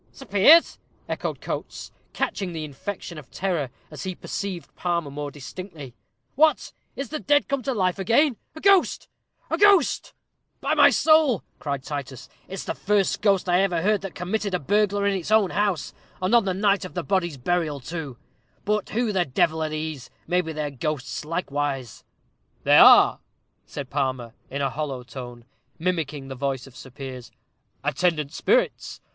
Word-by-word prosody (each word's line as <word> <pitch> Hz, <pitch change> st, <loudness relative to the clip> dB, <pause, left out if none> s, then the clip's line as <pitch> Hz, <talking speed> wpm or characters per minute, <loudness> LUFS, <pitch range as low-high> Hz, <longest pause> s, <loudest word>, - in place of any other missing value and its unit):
"Sir 270 Hz, -, -12 dB
Piers!" 225 Hz, -, +6 dB, 0.3 s
echoed -, -, -4 dB
Coates, -, -, -6 dB, 0.2 s
catching 185 Hz, -3 st, -2 dB
the 160 Hz, -1 st, -4 dB
infection 165 Hz, +3 st, -7 dB
of 140 Hz, -, -15 dB
terror, 175 Hz, -8 st, -2 dB, 0.2 s
as 150 Hz, -, -8 dB
he 185 Hz, -1 st, -4 dB
perceived 190 Hz, -2 st, -5 dB
Palmer 170 Hz, -5 st, -2 dB
more 145 Hz, +1 st, -5 dB
distinctly. 145 Hz, -1 st, -9 dB, 0.4 s
"What! 310 Hz, +3 st, +2 dB, 0.2 s
is 275 Hz, -3 st, -5 dB
the 310 Hz, -, -4 dB
dead 290 Hz, 0 st, +2 dB
come 275 Hz, -1 st, -1 dB
to 265 Hz, +2 st, -2 dB
life 185 Hz, -2 st, 0 dB
again? 235 Hz, -, +3 dB, 0.2 s
A 315 Hz, -, -9 dB
ghost, 395 Hz, -2 st, +3 dB, 0.4 s
a -, -, 0 dB
ghost!" 400 Hz, -7 st, +4 dB, 0.4 s
"By -, -, 0 dB
my -, -, +7 dB
soul," 310 Hz, -, +4 dB, 0.2 s
cried 140 Hz, -3 st, -3 dB
Titus, 140 Hz, -3 st, -6 dB, 0.2 s
"it's 190 Hz, -, -6 dB
the -, -, -3 dB
first 200 Hz, -1 st, +1 dB
ghost 195 Hz, -3 st, +2 dB
I 180 Hz, +1 st, +4 dB
ever 175 Hz, -4 st, 0 dB
heard 210 Hz, +2 st, +3 dB
of -, -, -18 dB
that 195 Hz, -2 st, -7 dB
committed 195 Hz, +2 st, -2 dB
a -, -, -1 dB
burglary 205 Hz, +4 st, +1 dB
in 195 Hz, -, -1 dB
its 175 Hz, -, -7 dB
own 215 Hz, -4 st, +4 dB
house, 205 Hz, -5 st, -1 dB, 0.3 s
and 185 Hz, +4 st, -1 dB
on 235 Hz, -4 st, +5 dB
the 190 Hz, -, 0 dB
night 200 Hz, 0 st, +2 dB
of 185 Hz, -, -8 dB
the 175 Hz, -, -2 dB
body's 175 Hz, -6 st, 0 dB
burial, 155 Hz, +1 st, -1 dB
too. 145 Hz, -2 st, -6 dB, 0.5 s
But 210 Hz, 0 st, 0 dB
who 230 Hz, 0 st, 0 dB
the 180 Hz, -2 st, +2 dB
devil 160 Hz, +4 st, +1 dB
are 155 Hz, -, -1 dB
these? 155 Hz, -3 st, -5 dB, 0.2 s
maybe 180 Hz, -2 st, 0 dB
they're 150 Hz, -2 st, -3 dB
ghosts 140 Hz, +1 st, -4 dB
likewise." 145 Hz, -6 st, -3 dB, 0.6 s
"They -, -, +6 dB
are," -, -, +8 dB, 0.5 s
said 140 Hz, -3 st, -7 dB
Palmer, 130 Hz, -4 st, -2 dB, 0.2 s
in 140 Hz, +1 st, -3 dB
a 135 Hz, -, 0 dB
hollow 135 Hz, -4 st, -4 dB
tone, 120 Hz, -2 st, -9 dB, 0.3 s
mimicking 160 Hz, -5 st, -2 dB
the 135 Hz, -, -6 dB
voice 135 Hz, -1 st, -3 dB
of 135 Hz, -2 st, -16 dB
Sir 130 Hz, -, -11 dB
Piers, 130 Hz, -2 st, -8 dB, 0.5 s
"attendant 150 Hz, +1 st, 0 dB
spirits. -, -, 0 dB
175 Hz, 170 wpm, -24 LUFS, 140-200 Hz, 0.6 s, are